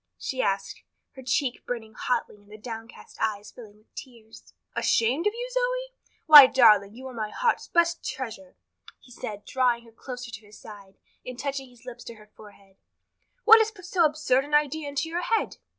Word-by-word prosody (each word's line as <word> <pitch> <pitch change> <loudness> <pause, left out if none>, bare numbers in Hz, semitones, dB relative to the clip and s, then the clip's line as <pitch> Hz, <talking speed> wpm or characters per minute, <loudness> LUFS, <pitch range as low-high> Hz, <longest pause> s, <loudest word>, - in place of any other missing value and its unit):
she 260 -1 -3
asked, 195 0 -2 0.3
her 265 - -12
cheek 255 0 -1
burning 225 -3 -6
hotly 240 -2 -3
and 205 0 -23
the 215 - -10
downcast 225 +1 -10
eyes 210 -2 -2
filling 215 -4 -14
with 215 - -31
tears. 230 -4 -13 0.2
"Ashamed 255 - +1
of 420 - 0
you, 485 +1 -5
Zoe? - - -2 0.3
Why, 295 -4 +11
darling, 215 -6 +4
you 260 +2 -11
are 260 - -8
my 215 -2 -4
heart's 470 - -1
best 340 -1 +1
treasure," 265 +1 -7 0.4
he 250 - -20
said, 210 -3 -8
drawing 245 -2 0
her 230 - -17
closer 245 +1 -9
to 220 -1 -10
his 210 - -15
side, 200 -2 -14 0.3
and 250 -1 -8
touching 270 -1 -5
his 245 -1 -21
lips 245 -1 -10
to 235 - -9
her 210 -1 -17
forehead. 200 -2 -17 0.7
"What 450 0 +8
has 440 -1 +2
put 395 -5 -15
so 360 -1 +1
absurd 295 -4 +1
an 295 +1 -1
idea 295 0 0
into 285 +3 -3
your 340 +2 -3
head?" 450 +5 -1
250 Hz, 190 wpm, -26 LUFS, 220-300 Hz, 0.7 s, Why